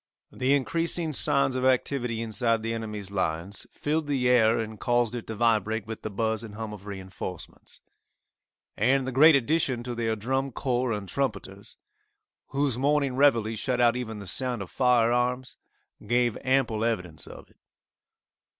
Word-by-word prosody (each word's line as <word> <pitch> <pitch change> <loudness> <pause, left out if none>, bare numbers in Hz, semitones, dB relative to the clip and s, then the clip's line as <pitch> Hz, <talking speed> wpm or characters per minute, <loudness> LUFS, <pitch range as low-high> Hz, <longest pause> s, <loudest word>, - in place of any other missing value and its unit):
The 135 +2 +1
increasing 165 +3 -1
signs 135 +4 +4
of 130 - -1
activity 125 -2 0
inside 115 +1 0
the 115 0 -2
enemy's 105 -3 -6
lines 95 0 -3
filled 155 +1 -2
the 135 -4 0
air 120 -2 +4
and 110 -1 -5
caused 120 -1 +1
it 120 -2 -6
to 110 - -5
vibrate 110 -1 +1
with 110 0 -7
the - - -4
buz 110 +1 -1
and 105 -2 -9
hum 110 -1 -5
of 105 0 -11
reinforcements, 95 -2 -8 0.9
and 130 +5 +2
the 130 - -3
great 150 +5 +7
addition 135 -2 +1
to 125 0 -5
their 115 -1 -1
drum 130 +5 -2
corps 125 -1 -1
and 105 -3 -4
trumpeters, 100 -4 -4 0.7
whose 140 -3 -1
morning 140 -1 +1
reveille 115 -5 +3
shut 125 +3 -2
out 120 -1 +4
even 115 -3 -4
the 100 - -8
sound 125 +2 -2
of 90 - -13
fire 125 -3 +3
arms, 125 +1 -1 0.5
gave 120 0 +2
ample 130 -5 +1
evidence 90 -9 -3
of - - -12
it. - - -29
120 Hz, 160 wpm, -27 LUFS, 110-130 Hz, 0.9 s, great